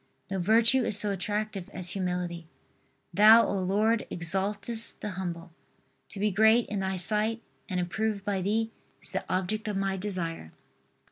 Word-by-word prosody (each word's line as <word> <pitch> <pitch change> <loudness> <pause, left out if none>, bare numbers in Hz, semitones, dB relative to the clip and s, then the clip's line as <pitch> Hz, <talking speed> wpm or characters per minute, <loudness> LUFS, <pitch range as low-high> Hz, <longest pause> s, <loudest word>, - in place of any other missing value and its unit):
No 195 - -1
virtue 230 +7 +3
is 210 - +3
so 210 -1 +3
attractive 205 -1 -3
as 180 -1 +5
humility. 180 -3 -3 0.7
Thou, 220 +2 +7
O - - -2
Lord, 210 +5 +1
exaltest 200 +6 -2
the 210 - -4
humble. 175 -2 -6 0.6
To 195 - -9
be 210 +1 +1
great 220 +4 +4
in 205 - -2
Thy 190 0 -2
sight 215 +5 +1 0.3
and 185 -2 -1
approved 205 +3 -2
by 200 -2 -1
Thee 220 +4 -1 0.3
is - - -8
the - - -3
object 190 +4 -2
of 205 -2 -2
my 195 0 -1
desire. 175 - -4
200 Hz, 155 wpm, -28 LUFS, 185-215 Hz, 0.7 s, Thou